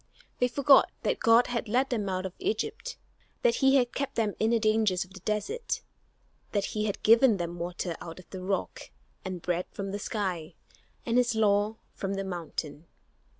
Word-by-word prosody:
They 250 Hz, -, +4 dB
forgot 275 Hz, +2 st, +5 dB
that -, -, 0 dB
God 230 Hz, +2 st, +5 dB
had 235 Hz, -1 st, -3 dB
led 255 Hz, +4 st, +2 dB
them 210 Hz, -5 st, -1 dB
out 185 Hz, 0 st, -2 dB
of 185 Hz, -, -5 dB
Egypt, 440 Hz, -, -3 dB, 0.5 s
that 485 Hz, -1 st, +3 dB
he 270 Hz, 0 st, +4 dB
had 245 Hz, -3 st, +3 dB
kept 275 Hz, 0 st, -3 dB
them 215 Hz, -3 st, +1 dB
in 220 Hz, -, +2 dB
the 235 Hz, -, +4 dB
dangers 215 Hz, -4 st, +2 dB
of 190 Hz, -, -19 dB
the 195 Hz, -, -10 dB
desert, 420 Hz, -, -2 dB, 0.7 s
that 200 Hz, -2 st, +1 dB
he 215 Hz, 0 st, 0 dB
had 205 Hz, -, -3 dB
given 230 Hz, 0 st, +6 dB
them 175 Hz, -1 st, -4 dB
water 175 Hz, 0 st, -3 dB
out 165 Hz, -1 st, -8 dB
of 185 Hz, -, -13 dB
the 185 Hz, -, -6 dB
rock, 195 Hz, +1 st, -3 dB, 0.3 s
and 185 Hz, -3 st, -5 dB
bread 180 Hz, 0 st, -1 dB
from 195 Hz, -1 st, -5 dB
the 205 Hz, -, -3 dB
sky, 180 Hz, -6 st, -3 dB, 0.5 s
and 240 Hz, +1 st, +3 dB
his 240 Hz, -2 st, +1 dB
law 210 Hz, 0 st, +2 dB, 0.2 s
from 195 Hz, 0 st, -3 dB
the 195 Hz, -, -2 dB
mountain. 165 Hz, -4 st, -5 dB
210 Hz, 190 wpm, -29 LUFS, 185-235 Hz, 0.7 s, given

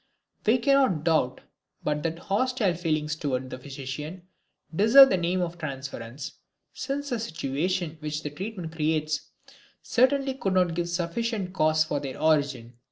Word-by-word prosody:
We 225 Hz, +4 st, +6 dB
cannot 255 Hz, -, +3 dB
doubt 155 Hz, -6 st, +1 dB, 0.4 s
but 150 Hz, 0 st, 0 dB
that 165 Hz, +1 st, -1 dB
the 170 Hz, -, -14 dB
hostile 215 Hz, -1 st, +1 dB
feelings 155 Hz, -3 st, -1 dB
toward 130 Hz, -4 st, -2 dB
the 130 Hz, -, -6 dB
physician 140 Hz, +6 st, -6 dB, 0.5 s
deserve 245 Hz, +8 st, +8 dB
the 190 Hz, -, +3 dB
name 180 Hz, +1 st, 0 dB
of 175 Hz, -1 st, -3 dB
transference, 135 Hz, -3 st, -6 dB, 0.3 s
since 280 Hz, +2 st, -3 dB
the 240 Hz, -, 0 dB
situation 165 Hz, -3 st, -2 dB
which 150 Hz, 0 st, -4 dB
the 150 Hz, -, -4 dB
treatment 185 Hz, 0 st, -6 dB
creates 155 Hz, -1 st, -1 dB, 0.5 s
certainly 270 Hz, +2 st, +2 dB
could 195 Hz, -8 st, -2 dB
not 180 Hz, -2 st, +3 dB
give 175 Hz, +1 st, -2 dB
sufficient 185 Hz, +3 st, -2 dB
cause 155 Hz, -3 st, +3 dB
for 150 Hz, -2 st, -2 dB
their 135 Hz, -2 st, -6 dB
origin. 140 Hz, -7 st, +1 dB
165 Hz, 150 wpm, -27 LUFS, 150-195 Hz, 0.5 s, deserve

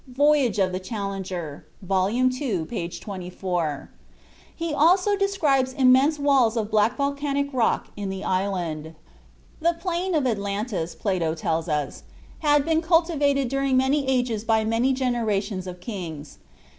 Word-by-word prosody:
("Voyage 275 Hz, -3 st, +2 dB
of 190 Hz, -2 st, +2 dB
the 185 Hz, -, -3 dB
Challenger," 190 Hz, -6 st, -5 dB, 0.2 s
vol. 190 Hz, 0 st, +1 dB
ii., 255 Hz, -, 0 dB
p. 170 Hz, -3 st, -4 dB
24). 180 Hz, -5 st, -4 dB, 0.6 s
He 330 Hz, -2 st, -3 dB
also 365 Hz, +7 st, +4 dB
describes 305 Hz, -10 st, +1 dB
immense 265 Hz, +3 st, +4 dB
walls 270 Hz, -5 st, +3 dB
of 215 Hz, -1 st, -2 dB
black 215 Hz, +1 st, +2 dB
volcanic 280 Hz, 0 st, -1 dB
rock 245 Hz, -3 st, +1 dB
in 205 Hz, -1 st, -4 dB
the 190 Hz, 0 st, -5 dB
island. 175 Hz, -5 st, -2 dB, 0.6 s
The 340 Hz, +1 st, +2 dB
plain 360 Hz, 0 st, -1 dB
of 295 Hz, -4 st, +1 dB
Atlantis, 200 Hz, -5 st, -2 dB
Plato 175 Hz, -6 st, -1 dB
tells 165 Hz, +1 st, -2 dB
us, 150 Hz, -2 st, -2 dB, 0.4 s
"had 295 Hz, -2 st, +3 dB
been 325 Hz, 0 st, +2 dB
cultivated 320 Hz, -5 st, +2 dB
during 275 Hz, 0 st, +1 dB
many 265 Hz, +2 st, +2 dB
ages 245 Hz, -5 st, 0 dB
by 220 Hz, -1 st, +2 dB
many 230 Hz, +4 st, +2 dB
generations 220 Hz, -7 st, -1 dB
of 180 Hz, 0 st, -7 dB
kings." 170 Hz, -9 st, -7 dB
235 Hz, 135 wpm, -24 LUFS, 185-280 Hz, 0.6 s, also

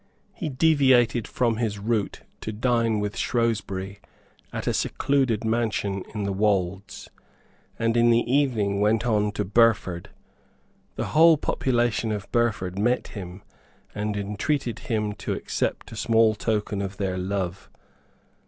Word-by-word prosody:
He 160 Hz, -, -4 dB
deviated 130 Hz, -5 st, +3 dB
from 115 Hz, -3 st, 0 dB
his 110 Hz, -3 st, -1 dB
route 105 Hz, 0 st, -2 dB, 0.2 s
to 110 Hz, -, -5 dB
dine 115 Hz, 0 st, +1 dB
with 105 Hz, 0 st, -3 dB
Shrewsbury 100 Hz, -5 st, -1 dB, 0.5 s
at -, -, -5 dB
a -, -, +1 dB
secluded 130 Hz, -6 st, 0 dB
mansion 110 Hz, -4 st, -1 dB
in 105 Hz, -, -2 dB
the 100 Hz, 0 st, -1 dB
Wolds, 95 Hz, -2 st, -1 dB, 0.7 s
and 115 Hz, 0 st, 0 dB
in 120 Hz, 0 st, +4 dB
the 115 Hz, 0 st, +4 dB
evening 120 Hz, -7 st, +1 dB
went 110 Hz, +2 st, +2 dB
on 105 Hz, -3 st, +1 dB
to 105 Hz, -1 st, -2 dB
Burford. 105 Hz, -4 st, +2 dB, 0.9 s
The -, -, -3 dB
whole 160 Hz, +1 st, +7 dB
population 120 Hz, -5 st, 0 dB
of 105 Hz, -2 st, -5 dB
Burford 100 Hz, -6 st, 0 dB
met 120 Hz, +4 st, +1 dB
him, 95 Hz, -2 st, -8 dB, 0.5 s
and 105 Hz, 0 st, -2 dB
entreated 105 Hz, +6 st, -2 dB
him 110 Hz, -7 st, -2 dB
to -, -, -2 dB
accept -, -, -3 dB
a -, -, -8 dB
small 115 Hz, -1 st, +3 dB
token 105 Hz, -2 st, -2 dB
of 95 Hz, 0 st, -5 dB
their 95 Hz, -2 st, -2 dB
love. 95 Hz, 0 st, -3 dB
110 Hz, 135 wpm, -25 LUFS, 100-120 Hz, 0.9 s, whole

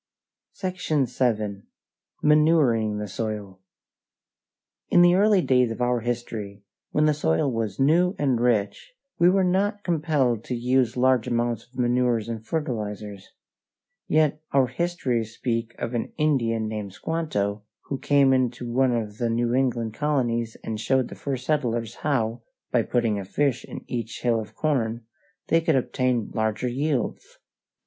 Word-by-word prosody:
SECTION 180 Hz, -7 st, -1 dB
VII. 110 Hz, -5 st, -1 dB, 0.6 s
MANURING 150 Hz, -9 st, +4 dB
THE 105 Hz, 0 st, -4 dB
SOIL 105 Hz, -2 st, -5 dB, 1.3 s
In 175 Hz, -, +6 dB
the 175 Hz, 0 st, +6 dB
early 200 Hz, 0 st, +4 dB
days 125 Hz, -2 st, +3 dB
of 115 Hz, -, -5 dB
our 125 Hz, 0 st, +1 dB
history, 110 Hz, -4 st, -4 dB, 0.3 s
when 150 Hz, -, +2 dB
the 155 Hz, -, +4 dB
soil 135 Hz, -, +1 dB
was 110 Hz, -4 st, -3 dB
new 170 Hz, +7 st, +3 dB
and 135 Hz, -5 st, +1 dB
rich, 120 Hz, -, 0 dB, 0.3 s
we 170 Hz, +1 st, +6 dB
were 190 Hz, +1 st, +3 dB
not 200 Hz, +3 st, +1 dB
compelled 145 Hz, -, +1 dB
to 125 Hz, -, -3 dB
use 125 Hz, 0 st, +1 dB
large 130 Hz, -2 st, +3 dB
amounts 120 Hz, -1 st, -1 dB
of 125 Hz, -, -20 dB
manures 120 Hz, -2 st, +1 dB
and 115 Hz, -2 st, -5 dB
fertilizers. 105 Hz, -, -4 dB, 0.8 s
Yet 155 Hz, -1 st, +2 dB
our 135 Hz, -1 st, +4 dB
histories 125 Hz, -6 st, -2 dB
speak 115 Hz, -1 st, -2 dB
of 115 Hz, -, -4 dB
an 120 Hz, -, -3 dB
Indian 115 Hz, -8 st, +1 dB
named 105 Hz, -3 st, -5 dB
Squanto 105 Hz, -, -2 dB, 0.2 s
who 135 Hz, -, -5 dB
came 140 Hz, -2 st, +4 dB
into 125 Hz, -2 st, 0 dB
one 130 Hz, -1 st, +3 dB
of 110 Hz, -2 st, -4 dB
the 120 Hz, -1 st, 0 dB
New 120 Hz, +1 st, 0 dB
England 120 Hz, -4 st, 0 dB
colonies 120 Hz, -6 st, -1 dB
and 110 Hz, -1 st, -4 dB
showed 130 Hz, +2 st, +1 dB
the -, -, -8 dB
first 130 Hz, -3 st, -4 dB
settlers 120 Hz, -7 st, -1 dB
how, 120 Hz, -5 st, -1 dB, 0.3 s
by 120 Hz, -, +3 dB
putting 115 Hz, -3 st, 0 dB
a -, -, -4 dB
fish 130 Hz, +6 st, 0 dB
in -, -, -9 dB
each 115 Hz, -2 st, -5 dB
hill 120 Hz, -2 st, +2 dB
of 110 Hz, -, -8 dB
corn, 120 Hz, -7 st, -1 dB, 0.4 s
they 165 Hz, -, +4 dB
could 160 Hz, -2 st, +2 dB
obtain 125 Hz, -3 st, 0 dB
larger 110 Hz, +2 st, -1 dB
yields. 135 Hz, -1 st, -2 dB
125 Hz, 150 wpm, -25 LUFS, 115-145 Hz, 1.3 s, In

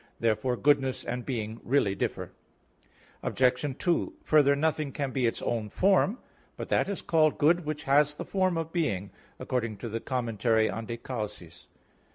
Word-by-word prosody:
Therefore 115 Hz, +2 st, +1 dB
goodness 135 Hz, -2 st, +2 dB
and 125 Hz, -1 st, -4 dB
being 115 Hz, -3 st, -4 dB
really 120 Hz, -6 st, +2 dB
differ. 95 Hz, -, -3 dB, 0.9 s
Obj. 130 Hz, +2 st, +1 dB
2: 175 Hz, -2 st, 0 dB
Further, 145 Hz, -2 st, +4 dB
nothing 155 Hz, -1 st, 0 dB
can 140 Hz, -1 st, -3 dB
be 130 Hz, -3 st, +1 dB
its 115 Hz, -, -3 dB
own 115 Hz, -3 st, -2 dB
form. 195 Hz, -, +3 dB, 0.4 s
"But -, -, -6 dB
that -, -, +2 dB
is 200 Hz, -, -4 dB
called 155 Hz, -2 st, +3 dB
good 170 Hz, +3 st, +3 dB
which 150 Hz, 0 st, -4 dB
has 145 Hz, +1 st, +3 dB
the -, -, -6 dB
form 185 Hz, -3 st, +1 dB
of 165 Hz, 0 st, -4 dB
being," 100 Hz, -, -1 dB, 0.3 s
according 115 Hz, -4 st, -2 dB
to 115 Hz, -, -6 dB
the 115 Hz, +2 st, -3 dB
commentary 115 Hz, -3 st, 0 dB
on 110 Hz, +2 st, -5 dB
_De 115 Hz, 0 st, -5 dB
Causis. 105 Hz, -9 st, -7 dB
130 Hz, 165 wpm, -28 LUFS, 115-155 Hz, 0.9 s, Further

